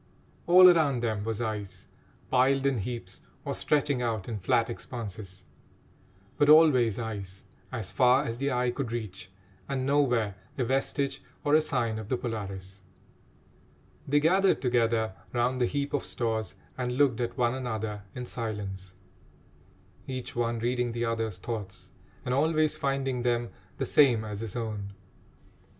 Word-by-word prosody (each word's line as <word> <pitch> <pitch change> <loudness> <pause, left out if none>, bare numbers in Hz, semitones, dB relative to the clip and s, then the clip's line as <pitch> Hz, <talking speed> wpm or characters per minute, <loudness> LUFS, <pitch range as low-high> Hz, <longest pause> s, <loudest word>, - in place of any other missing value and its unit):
All 185 +1 +9
around 155 -8 +4
them 110 -3 -1
was 110 0 -3
ice, 105 -4 -5 0.5
piled 135 +1 +3
in 135 -4 +2
heaps, 100 -3 -5 0.2
or - - -2
stretching 145 -3 +1
out 110 -5 -2
in 110 -3 -4
flat 115 +5 +2
expanses; 105 -6 -7 0.9
but 145 - +4
always 135 -9 +6
ice, 100 -5 -5 0.3
as 115 -7 -4
far 130 +1 +4
as 115 -2 -4
the 140 +1 0
eye 125 0 +1
could 125 -2 -4
reach, 100 -6 -5 0.4
and 130 -2 -1
nowhere 125 -7 +2 0.2
a 130 - +1
vestige 135 +2 -1 0.2
or 145 - +1
a 155 - +7
sign 120 -7 -1
of 110 -1 -8
the 130 - +1
Polaris. 100 -5 -6 1.3
They 145 +2 +4
gathered 190 +6 +3
together 115 -4 +1 0.2
round 125 +1 +1
the 120 - +3
heap 140 +1 -2
of 145 - 0
stores 110 -4 -2 0.2
and 125 -1 -1
looked 135 -5 +3
at 120 - -3
one 120 -1 +2
another 110 -5 -3
in 125 -1 -5
silence, 100 -6 -5 1.1
each 130 -2 -5
one 120 -1 0
reading 120 +1 -1
the 120 0 -1
other's 115 -4 -2
thoughts 100 -2 -6 0.3
and 125 - 0
always 155 +2 +2
finding 135 -3 -1
them 120 -1 0 0.3
the - - -1
same 120 -7 +4
as 105 -1 -5
his 110 -3 -5
own. 105 -4 -4
120 Hz, 150 wpm, -28 LUFS, 110-135 Hz, 1.3 s, All